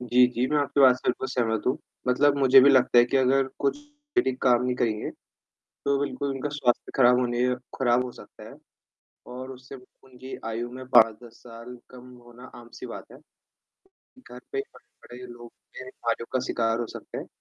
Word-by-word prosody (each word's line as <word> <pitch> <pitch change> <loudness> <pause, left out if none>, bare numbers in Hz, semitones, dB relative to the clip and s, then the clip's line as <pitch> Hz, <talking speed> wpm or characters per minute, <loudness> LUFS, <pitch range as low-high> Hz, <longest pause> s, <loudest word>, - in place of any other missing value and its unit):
जी, 125 0 +4
जी, 125 0 -2
मैं 150 - +1
आपकी 145 0 0
बात 130 -2 +7
से - - -5
बिल्कुल 130 +1 -1
सहमत 115 -4 -1
हूँ, 130 - +1 0.3
मतलब 140 +3 +3
मुझे 135 -1 +7
भी 140 +2 +6
लगता 130 -2 +4
है 120 - +7
कि 125 - -1
अगर 135 +1 +2
कुछ 140 - 0 0.4
ये - - +5
ठीक 130 -1 -3
काम 125 -2 +4
नहीं 125 - 0
करेंगे, 110 -4 -1 0.5
तो 140 0 -3
बिल्कुल 140 +1 -4
उनका 135 +2 -4
स्वास्थ्य 135 -5 -1
खराब 125 -1 +5
होने 120 0 0 0.3
खराब 125 -1 +2
हो 125 - -7
सकता - - -14
है। - - -13 0.7
और 130 +1 -8
उससे 130 +1 -11
ब 125 - -18 0.2
उनकी 130 0 -10
आयु 115 +2 -4
में 130 +1 -9
5-10 115 +1 +4
साल 115 +1 -11
कम 125 0 -13 0.2
होना 120 +1 -15 0.2
आम-सी 120 0 -11
बात - - -9
है। - - -13 1.1
घर 125 - -11
पे 410 - -1
पड़े-पड़े 125 - -14
लोग 120 0 -13 0.2
ये 130 - -7
बीमारियों 115 -2 -4
का 130 - +1
शिकार 115 0 -1
हो 120 - -3
सकते - - -9
हैं। - - -7
125 Hz, 195 wpm, -25 LUFS, 120-130 Hz, 1.1 s, बात